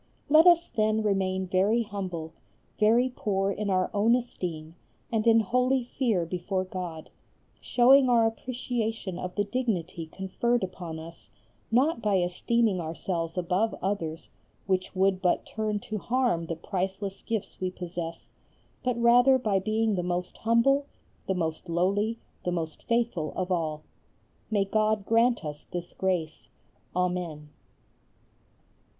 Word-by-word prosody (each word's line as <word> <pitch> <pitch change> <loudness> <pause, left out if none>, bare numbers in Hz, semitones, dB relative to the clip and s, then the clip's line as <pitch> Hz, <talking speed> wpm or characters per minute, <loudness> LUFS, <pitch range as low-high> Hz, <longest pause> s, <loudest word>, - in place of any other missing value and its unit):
Let 315 +4 +7
us 345 -1 +6
then 215 0 +1
remain 190 -2 0
very 195 +6 +2
humble, 180 -6 -5 0.5
very 230 +4 +4
poor 195 -1 0
in 205 +1 -3
our 185 -1 +1
own 215 +3 +4
esteem, 170 -10 -4 0.4
and 225 0 0
in 225 0 +6
holy 250 +5 +1
fear 235 -8 0
before 180 +2 -2
God, 180 -4 -6 0.5
showing 260 +2 +5
our 235 -2 +5
appreciation 225 -4 -3
of 180 0 -5
the 205 - +2
dignity 195 -8 -2
conferred 195 +7 -1
upon 180 -3 -5
us 165 +1 -11 0.4
not 255 +3 +2
by 210 -2 +2
esteeming 185 +3 +1
ourselves 165 +1 -3
above 180 +5 +1
others, 170 -4 -3 0.3
which 185 0 -1
would 190 0 +2
but 180 -2 +1
turn 215 -1 -2
to 215 -1 -4
harm 235 -8 0
the 165 - -3
priceless 190 +3 -3
gifts 225 -5 -4
we 185 - 0
possess, 175 -2 -6 0.5
but 250 -2 -1
rather 245 +3 +6
by 210 -6 +1
being 215 +2 +1
the 180 - 0
most 180 0 -3
humble, 275 +5 +3 0.4
the 190 - 0
most 165 0 -3
lowly, 200 +6 +1 0.3
the 180 - -1
most 165 -3 -3
faithful 230 -10 0
of 185 0 -2
all. 155 -3 -1 0.7
May 205 -3 +2
God 215 0 +1
grant 230 -2 +3
us 150 -1 -7
this 175 0 -6
grace! 175 -5 -2 0.5
Amen. 180 -4 -2
195 Hz, 135 wpm, -28 LUFS, 180-230 Hz, 0.7 s, Let